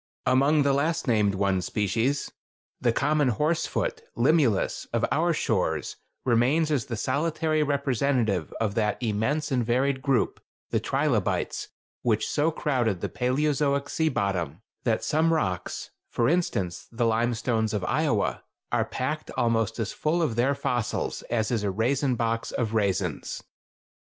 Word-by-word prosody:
Among 140 +4 +4
the 140 -1 +3
last 160 +3 0
named 105 -4 +3
one 95 -1 +1
species, 115 +9 0 0.5
the 120 - +2
common 145 +4 +2
horse 150 +7 +1
foot - - -2 0.2
(Limulus) 125 - +2
of - - +1
our 170 +3 +2
shores, 90 - -1 0.3
remains 130 +7 +3
as 135 -7 +1
the 115 - -3
solitary 155 +5 0
representative 135 - +1
of 110 -3 0
that 105 -2 0
immense 125 +7 -1
and 125 -2 +2
varied 130 +3 +1
group, 135 -2 +1 0.3
the - - +2
trilobites, - - 0 0.3
which 110 -3 +1
so 150 +2 +2
crowded 125 - 0
the - - -2
Paleozoic 140 +2 0
sea 160 -1 +1
bottom 95 - -2 0.2
that 115 -3 +1
some 160 +2 +2
rocks—for 115 - -2
instance, 110 - 0
the 120 0 0
limestones 115 -1 +1
of 105 -3 -2
Iowa—are - - -1
packed - - -3
almost 115 -1 +1
as 110 -3 -2
full 165 +3 0
of 125 -8 0
their 130 +4 +2
fossils 120 -4 -2
as 115 -1 0
is 115 -3 +1
a 105 - 0
raisin 125 +6 +1
box 115 -1 -1
of 115 -3 -2
raisins. 100 -4 -1
120 Hz, 140 wpm, -26 LUFS, 110-145 Hz, 0.5 s, Among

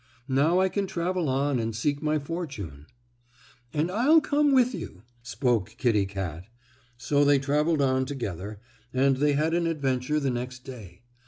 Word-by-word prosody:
Now 145 +7 +3
I 190 - +4
can 195 +1 -2
travel 180 -3 -1
on 135 0 +1
and 115 -1 -2
seek 145 +5 -1
my 155 0 +1
fortune." 140 - -6 0.8
"And 155 +4 -1
I'll 265 - +5
come 295 -1 +2
with 255 -2 +4
you," 95 - -8 0.2
spoke 115 -3 -1
Kittie 105 -5 +2
Kat. 95 -4 -5 0.5
So 145 +4 +1
they 145 0 +5
traveled 150 +2 +1
on 130 -1 +2
together, 105 - -5 0.3
and 135 +1 +2
they 145 +1 +2
had 155 +3 +1
an 170 0 +1
adventure 140 -2 0
the 140 -3 0
next 125 +1 -5
day. 105 -7 -11
140 Hz, 160 wpm, -27 LUFS, 120-165 Hz, 0.8 s, I'll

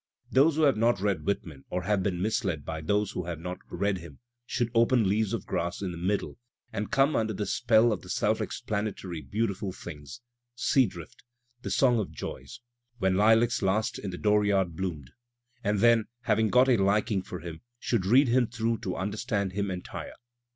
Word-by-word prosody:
Those 145 +4 +4
who 160 - +2
have 140 -6 +4
not 115 -2 +2
read 100 -1 -1
Whitman 80 -8 -3
or 90 - -2
have 100 +1 +1
been 90 -2 -1
misled 95 - -1
by 80 -1 -4
those 100 +6 0
who 90 - -4
have 85 -2 -4
not 90 +2 -5
read 100 -2 -1
him, 80 -5 -12 0.3
should 120 -2 -1
open 115 -1 +4
"Leaves 105 +1 +1
of - - -3
Grass" 85 +3 -2
in 95 - -2
the 85 - -7
middle, 100 +6 -2 0.3
and 105 - -3
come 140 +3 +3
under 110 -1 0
the 105 +1 -3
spell 115 +2 +3
of 95 - -5
the - - -13
self - - +1
explanatory 100 -5 -4
beautiful 100 +5 -2
things, 75 - -9 0.3
"Sea 130 +1 +3
Drift," 85 -4 -11 0.4
'^The - - -5
Song 125 -4 +3
of 105 - -2
Joys," 115 - -8 0.4
"When 95 -4 +1
LUacs 110 +3 +4
Last 110 +4 0
in 100 - -5
the 90 - -6
Dooryard 100 -4 +2
Bloomed," 80 -8 -4 0.5
^d 105 -1 +1
then, 115 -2 +5
having 110 -2 +2
got 125 +3 +5
a 125 -3 +4
liking 100 0 +2
for 90 -2 -8
him, 80 -1 -8 0.2
should 115 -6 -1
read 130 +6 +5
him 120 0 +3
through 115 -1 -1
to 90 - -4
understand 100 +1 -2
him 100 +1 -2
entire. 90 -1 -6
105 Hz, 190 wpm, -28 LUFS, 90-115 Hz, 0.5 s, then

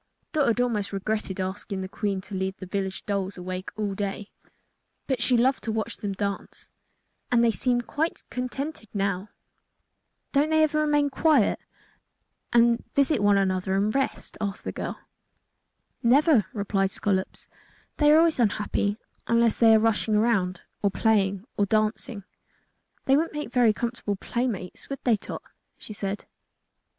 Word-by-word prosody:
Dot 300 -3 +2
had 235 0 +2
almost 220 -5 0
regretted 200 -1 -2
asking 190 +1 -3
the 190 - -4
Queen 195 0 -2
to 200 - -12
leave 190 0 -2
the 185 - -8
village 190 0 -3
dolls 195 -2 -2
awake 185 +1 -5
all 205 -2 -1
day; 200 +1 -4 0.7
but 260 -3 -1
she 245 0 +3
loved 260 +3 +2
to 225 - -1
watch 220 0 -3
them 205 -2 -3
dance, 200 0 -5 0.6
and 240 -1 +4
they 230 - +4
seemed 240 +1 0
quite 320 +3 -2
contented 255 -1 -4
now. 195 0 -1 1.0
"Don't 290 +2 +2
they 315 0 +4
ever 305 0 +2
remain 295 -1 +2
quiet, 285 -5 +3 0.9
and 235 0 +4
visit 280 -3 +3
with 205 -1 +4
each 195 -1 +2
other, 185 +1 -1
and 205 +2 +1
rest?" 270 -1 -2
asked 200 -1 -3
the - - -3
girl. - - -5 1.0
"Never," 260 - +5
replied 200 -2 0
Scollops. 190 -1 -2 0.5
"They 295 -1 +5
always 320 -1 +5
are - - +5
unhappy 205 0 -1 0.3
unless 230 -1 +3
they 225 -1 +7
are - - +6
rushing 220 -1 +2
around 200 -5 +1 0.2
or 200 - +3
playing 200 -2 +1
or 205 - +2
dancing." 215 0 0 0.8
"They 270 - +5
wouldn't 320 +3 +1
make 295 -5 -5
very 245 -3 +5
comfortable 230 -2 -3
playmates, 215 -4 -3
would 275 - -6
they, 240 -3 +4
Tot?" 205 - -7 0.3
she 215 - -8
said. 200 0 -4
215 Hz, 155 wpm, -26 LUFS, 195-250 Hz, 1.0 s, they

